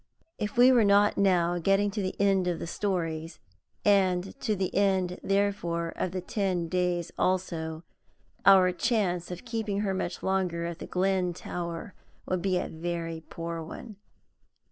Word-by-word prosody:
If 210 +1 -3
we 250 +2 +8
were 240 -3 +5
not 205 0 +4
now 175 -3 +2
getting 195 +3 +2
to 210 - -3
the 185 -1 -4
end 195 -2 +3
of 175 -2 0
the - - -5
stories, 165 -4 -2 0.5
and 190 -2 +3
to 220 -5 0
the 190 -1 -2
end, 190 -2 +1
therefore, 195 -4 0
of 185 - -1
the 185 0 -3
Ten 180 -3 -1
Days 180 -1 -1
also, 165 -3 -1 0.6
our 190 -2 +7
chance 180 -4 0
of 180 +5 -7
keeping 220 -4 -2
her 195 -2 0
much 180 -1 -3
longer 180 -3 0
at 170 0 -5
the - - -7
Glen 185 -1 +1
Tower 170 +3 -5 0.3
would 185 -1 -1
be 185 0 +1
a - - -2
very 165 0 -4
poor 165 0 -5
one. 200 +6 -9
185 Hz, 160 wpm, -28 LUFS, 170-200 Hz, 0.6 s, we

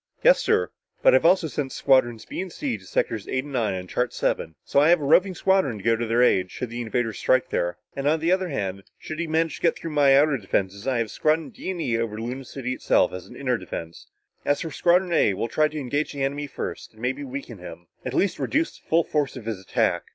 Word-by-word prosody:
"Yes, - - +6
sir. 445 0 +1 0.3
But - - +7
I've - - +5
also 185 -1 +4
sent 145 -3 -3
Squadrons 120 -4 +2
B - - -5
and 190 -1 -6
C 135 -6 -3
to 95 -3 -12
sectors 110 +1 -1
eight 130 0 -1
and 145 -1 -10
nine 110 -6 0
on 90 0 -5
chart 125 +6 -1
seven. 80 - -1
So - - +2
I 150 +3 +5
have 175 0 +5
a - - -5
roving 185 +6 +4
squadron 190 - +2
to 100 - -11
go 115 0 +3
to 115 0 -3
their 120 +2 +3
aid, 95 -6 +3
should 125 +3 -6
the 120 +1 -4
invader 115 0 -1
strike 130 +5 +1
there. 85 0 -1 0.2
And 140 0 -2
on 160 +2 +3
the 165 +3 +1
other 185 -1 +1
hand, 100 - -3 0.2
should 155 0 -7
he 170 - -1
manage 160 +1 0
to - - -16
get 165 - +2
through 165 - -6
my 140 -2 +5
outer 145 -1 +4
defense, 100 +2 -2
I 130 -2 +1
have 115 -2 -1
Squadrons 155 0 0
D - - -6
and 185 -2 -3
E 115 -8 0
over 110 -2 -3
Luna 125 +4 -5
City 130 0 -4
itself - - +2
as 95 - -7
an - - -13
inner 125 -4 -1
defense. 80 0 -8 0.4
As 145 - +1
for 165 - -4
Squadron 175 +3 +2
A, 105 - +3
we'll 115 - -2
try 155 +6 +2
to 155 - -8
engage 145 +3 -2
the 140 -1 -3
enemy 145 +2 -2
first - - -6
and 110 - -17
maybe 130 +3 -1
weaken 130 -5 -7
him; 90 -1 -10 0.2
at 130 +1 -4
least 200 - +1
reduce 320 +2 -1
the - - -34
full 165 +1 +3
force 145 -4 -1
of 120 - -9
his 110 -4 -3
attack. 95 - 0
135 Hz, 255 wpm, -24 LUFS, 115-160 Hz, 0.4 s, But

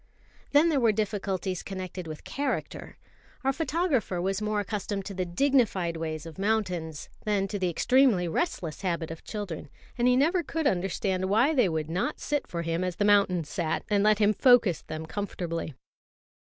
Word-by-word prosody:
Then 295 +4 +5
there 295 -4 +2
were 230 -3 +4
difficulties 195 -3 -2
connected 185 -2 -6
with 155 -1 -7
character. 280 -1 -4 0.5
Our 270 +1 +2
photographer 290 - 0
was 195 +3 -1
more 210 0 0
accustomed 205 -1 -3
to 200 - -5
the 185 -1 -2
dignified 195 -5 +2
ways 160 -1 -4
of 165 +2 -10
mountains 180 -7 -1 0.2
than 205 -2 +1
to 205 - -3
the 185 -1 +1
extremely 235 - +3
restless 165 - -2
habit 170 -4 -2
of 165 - -9
children; 185 -9 -6 0.3
and 240 - +3
he 250 - +5
never 330 +7 +3
could 325 0 -3
understand 190 -1 0
why 225 +10 +3
they 250 - +3
would 160 -1 -2
not 180 +4 -1
sit 290 -2 -2
for 170 -1 -4
him 165 +2 -1
as 180 -2 -2
the 205 - +1
mountains 195 -6 +3
sat, 170 -5 -1
and 200 -1 +3
let 215 0 +5
him 210 0 +4
focus 235 - +4
them 155 0 -6
comfortably. 165 -5 -4
195 Hz, 175 wpm, -28 LUFS, 175-225 Hz, 0.5 s, Then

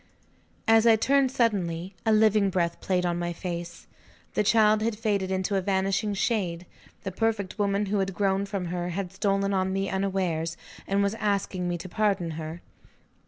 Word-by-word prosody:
As 225 +1 +5
I 225 - +7
turned 270 +3 +2
suddenly, 190 -7 0
a - - +5
living 215 -2 +4
breath 170 -2 -1
played 180 -1 0
on 175 0 0
my 175 0 -2
face. 170 -1 -6 0.5
The - - +2
child 215 0 +4
had 220 -1 -1
faded 205 -4 0
into 190 +1 -1
a - - +1
vanishing 195 +2 0
shade: 185 -5 -1 0.4
the 195 - -3
perfected 215 0 -1
woman 200 0 +1
who 200 +1 0
had 195 -1 -1
grown 195 0 +1
from 195 -3 -3
her 175 0 -2
had 185 +1 -4
stolen 195 0 0
on 190 0 +1
me 195 0 -1
unawares, 185 -4 -1 0.3
and 200 +1 +2
was 200 +1 +1
asking 200 -4 -1
me 175 - -1
to 175 +2 -8
pardon 195 -3 0
her. 160 +2 -6
195 Hz, 175 wpm, -27 LUFS, 180-210 Hz, 0.5 s, I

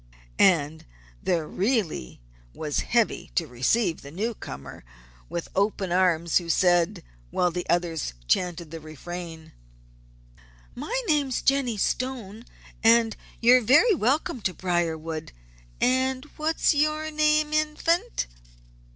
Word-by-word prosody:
And 160 -4 +3 0.4
there 165 -4 0
really 195 - -1 0.3
was 150 -2 -2
Heavy 235 -2 0
to 170 - +1
receive 160 - 0
the 140 - -10
newcomer 180 - -6 0.5
with 170 0 -4
open 200 -2 0
arms, 175 -2 +3
who 170 -1 -9
said, 175 -1 +2 0.3
while 180 - +1
the 175 +1 -5
others 165 - -1
chanted 175 - 0
the 165 - -6
refrain: 160 +1 -8 1.2
"My 375 - -3
name's 285 -6 +1
Jennie 270 -5 +2
Stone, 230 -1 -2 0.4
and 225 0 +5 0.3
you're 250 +2 +6
very 300 - +5
welcome 265 - 0
to 190 -2 -2
Briarwood, 165 - -2 0.5
and 260 +1 +1
what's 315 +2 +1
your 305 +1 0
name, 305 0 +2
Infant?" 310 - 0
190 Hz, 110 wpm, -26 LUFS, 165-260 Hz, 1.2 s, you're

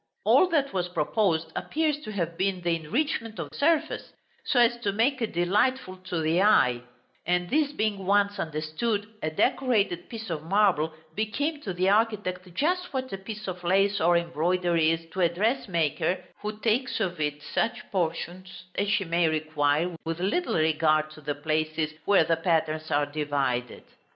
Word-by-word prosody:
All 370 - +6
that 290 -5 +1
was 180 -2 0
proposed 165 -1 0
appears 305 -1 0
to 295 - -8
have 170 -5 -2
been 185 +1 -1
the 170 -1 +1
enrichment 225 - -2
of 155 -3 -6
surface, 315 - 0 0.3
so 250 - +2
as 240 0 +5
to 210 -4 -1
make 245 +6 +1
it 225 - -1
delightful 185 +4 +1
to 185 -2 -4
the 160 +3 +2
eye; 125 - +4 0.5
and 180 0 0
this 295 -1 +2
being 215 -8 -2
once 200 0 +2
understood, 160 +8 -2 0.2
a 155 - -1
decorated 200 0 +1
piece 225 -4 -6
of 155 -2 -3
marble 175 -2 +2 0.2
became 285 - -2
to 200 - -4
the 185 +1 +1
architect 200 -4 0
just 355 - 0
what 260 -3 -3
a - - -2
piece 210 +1 -7
of 180 -1 -5
lace 195 +3 +2
or 170 +1 +4
embroidery 170 0 +1
is 165 0 -1
to 185 - -3
a 170 - +4
dressmaker, 185 - 0 0.2
who 210 0 -5
takes 235 +4 +1
of 180 -6 -2
it 150 -1 -2
such 240 +2 -1
portions 180 +1 -3
as 200 0 -1
she 205 -2 +1
may 170 0 +2
require, 155 +2 0
with 165 +1 -3
little 210 - 0
regard 155 -1 +2
to 155 - -13
the 145 0 -3
places 155 +1 -1
where 200 -4 +5
the 165 +1 +1
patterns 155 -2 0
are 145 -1 +2
divided. 140 -4 -2
180 Hz, 170 wpm, -27 LUFS, 160-215 Hz, 0.5 s, All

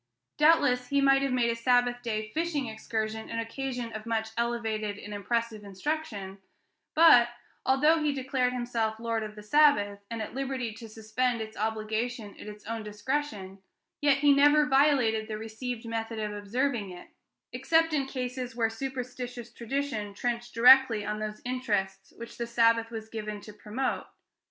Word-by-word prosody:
Doubtless 285 -5 +4
he 280 +1 +1
might 275 0 +5
have 275 -1 0
made 240 -2 +2
a - - -2
Sabbath 245 +1 +2
day 215 -2 -3
fishing 320 -4 -1
excursion 220 -1 -4
an 230 - -4
occasion 245 0 -4
of 215 +1 -7
much 225 -1 -1
elevated 225 -3 -2
and 210 0 -8
impressive 220 +1 -2
instruction; 200 -2 -4 0.6
but, 305 -7 +7 0.4
although 300 +5 +4
he 300 -1 +2
declared 260 -2 0
himself 235 -3 -2
'Lord 230 -1 -1
of 215 -1 -6
the 210 - -10
Sabbath 210 -6 +4
day,' 200 - -38
and 230 -1 -4
at 220 - -5
liberty 260 -3 -3
to 225 +1 -10
suspend 225 +3 -1
its 220 0 -6
obligation 220 +1 -2
at - - -9
his 210 0 -10
own 225 +1 -4
discretion, 210 -2 -4 0.4
yet 285 -1 +4
he 285 0 +5
never 295 +2 +5
violated 270 -6 +3
the 215 - -4
received 225 +2 -6
method 225 0 -4
of 210 -1 -3
observing 215 +1 -1
it, 180 -1 -11 0.4
except 325 0 +2
in 275 -3 0
cases 250 -2 -4
where 225 -2 +1
superstitious 245 -1 -6
tradition 235 -5 -3
trenched 240 +1 -3
directly 245 -3 +7
on 210 0 -3
those 215 0 -5
interests 210 -7 -2
which 235 +1 -10
the 235 - -2
Sabbath 230 -1 +3
was 220 -1 -7
given 215 -2 -5
to 210 - -11
promote. 215 +5 -3
235 Hz, 165 wpm, -28 LUFS, 215-260 Hz, 0.6 s, but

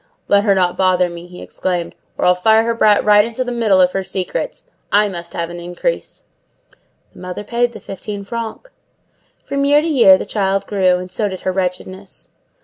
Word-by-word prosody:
"Let 200 +1 +3
her 200 -2 +4
not 180 -2 +1
bother 185 -2 +2
me," 170 0 -9
he 180 0 -11
exclaimed, 175 -2 -3 0.2
"or - - -1
I'll 180 - +6
fire 220 +5 +3
her 230 0 0
brat 210 -2 +3
right 210 0 +6
into 230 +3 -3
the 245 - -5
middle 225 -5 +2
of 180 -1 +4
her 195 - -2
secrets. 185 -1 -4 0.3
I 210 +1 +4
must 175 -3 -7
have 170 0 -3
an 175 - -7
increase." 175 - -4 0.9
The - - -15
mother 180 +3 -6
paid 240 +2 -1
the - - -9
fifteen 200 +1 -7
francs. 230 - -6 0.7
From 280 0 -2
year 290 +1 +4
to - - -2
year 235 -11 +6
the - - -5
child 195 -2 -1
grew, 185 -3 +2
and 180 0 -8
so 210 +3 -1
did 190 -2 -6
her 185 - -1
wretchedness. 185 +1 -5
195 Hz, 200 wpm, -18 LUFS, 180-220 Hz, 0.9 s, I'll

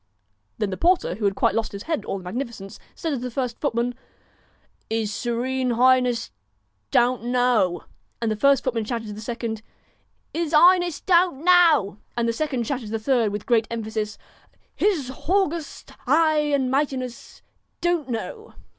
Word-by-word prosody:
Then 210 -3 -1
the 185 - -4
porter, 350 - +2
who 205 +3 -3
had 195 -1 +1
quite - - +2
lost 225 -1 -2
his 200 - -6
head 320 -3 -1
at - - -13
all - - -3
the 190 - -10
magnificence, 205 0 -6 0.2
said 330 -3 -3
to 280 - -1
the 250 +1 -4
first 250 -1 -3
footman 245 -3 0
1 - - -31 0.9
His 220 -2 -1
Serene 250 +4 -1
Highness 250 -1 +3 0.6
Don't 240 -1 +2
know.' 245 -7 +2 0.4
And 230 -2 -1
the - - 0
first 275 +4 +3
footman 235 -4 -1
shouted 225 -1 -4
to - - -5
the 210 - -8
second 230 -1 -4 0.4
' - - -43
'Is 330 -1 -1
'Iness 350 -1 +5
Don't 345 -5 +2
know.' 330 - +4 0.2
And 235 -1 +1
the 230 - +1
second 260 -2 -2
shouted 255 -3 -3
to - - -8
the - - +1
third, 230 -2 +1
with 205 0 -5
great 230 -2 +2
emphasis 220 -2 -4 0.6
'His 335 -11 +1
Haugust 340 0 -2 0.2
'igh 305 +1 +3
and 265 -3 +1
Mightiness 265 -3 -3 0.4
Don't 345 -6 0
know.' 435 - -6
250 Hz, 175 wpm, -23 LUFS, 225-300 Hz, 0.9 s, Iness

